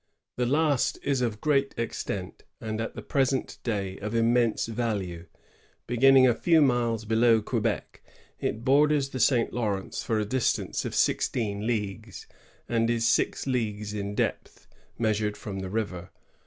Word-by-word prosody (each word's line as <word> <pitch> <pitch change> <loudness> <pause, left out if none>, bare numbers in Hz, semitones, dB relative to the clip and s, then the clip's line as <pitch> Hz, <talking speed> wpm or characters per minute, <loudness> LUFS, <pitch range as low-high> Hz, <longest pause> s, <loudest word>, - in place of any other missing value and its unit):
The 125 -1 0
last 145 -1 +2
is 140 -2 0
of 115 -3 -1
great 140 -3 +1
extent, 100 -5 -4 0.2
and 110 0 -4
at 115 - -5
the - - -7
present 135 -1 0
day 100 -5 -3
of 105 +3 -4
immense 115 0 +2
value. 105 -7 -3 0.6
Beginning 130 +2 +5
a 120 - +4
few 165 +6 +3
miles 120 -5 +2
below 115 +1 +4
Quebec, 110 0 -2 0.4
it 115 +2 -3
borders 145 0 +3
the 130 - -5
St. 120 0 +2
Lawrence 105 -5 -2
for 110 - 0
a 105 - -1
distance 130 +3 -1
of - - -4
sixteen 105 -3 0
leagues, 110 -2 -3 0.4
and 115 -1 +1
is 115 -1 +1
six - - +1
leagues 105 -5 -2
in 100 -1 -4
depth, - - -3 0.3
measured 105 -2 0
from 100 -3 -6
the 95 -1 -5
river. 95 -4 -3
115 Hz, 150 wpm, -27 LUFS, 105-125 Hz, 0.6 s, Beginning